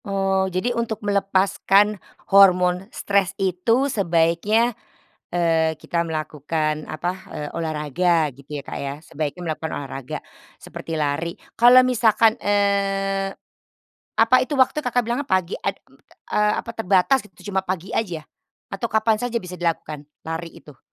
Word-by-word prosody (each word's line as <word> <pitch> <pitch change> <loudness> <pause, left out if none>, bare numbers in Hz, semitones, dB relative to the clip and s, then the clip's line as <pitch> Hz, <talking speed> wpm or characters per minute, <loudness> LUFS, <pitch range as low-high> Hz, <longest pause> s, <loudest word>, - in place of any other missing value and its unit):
Oh, 195 -1 0
jadi 185 +7 -1
untuk 230 -2 -2
melepaskan 200 0 +2 0.3
hormon 185 -1 +5
stres 200 -3 0
itu 195 +7 +1
sebaiknya, 200 +2 +2 0.6
eee, 160 -2 +1
kita 170 +1 -1
melakukan 155 -1 -2
apa, 165 +3 -2 0.2
eee, 150 0 -5
olahraga 160 +1 +1
gitu 140 +2 -7
ya, - - -7
Kak, - - -5
ya? 140 0 -3
Sebaiknya 155 +2 -5
melakukan 160 0 -3
olahraga, 135 -2 -6 0.4
seperti 160 -1 -6
lari. 150 +3 -2 0.2
Kalau 245 +2 +8
misalkan, 225 -2 +4
eee, 195 -1 0 0.8
apa 230 +3 +5
itu, 290 +3 -1
waktu 265 +2 +3
Kakak 245 0 +2
bilang 240 +5 -2
pagi 185 -7 0
ad 195 - -2 0.6
eee, 210 0 +2
apa - - -8
terbatas 225 +3 +2
gitu 205 +1 -11
cuma 190 - 0
pagi 185 0 -3
aja 175 -8 -2 0.5
atau 195 +4 -3
kapan 220 0 +2
saja 240 -2 -2
bisa 180 0 -8
dilakukan 155 -3 -3 0.2
lari 165 +1 -6
itu? 145 -4 -15
190 Hz, 135 wpm, -22 LUFS, 165-210 Hz, 0.8 s, Kalau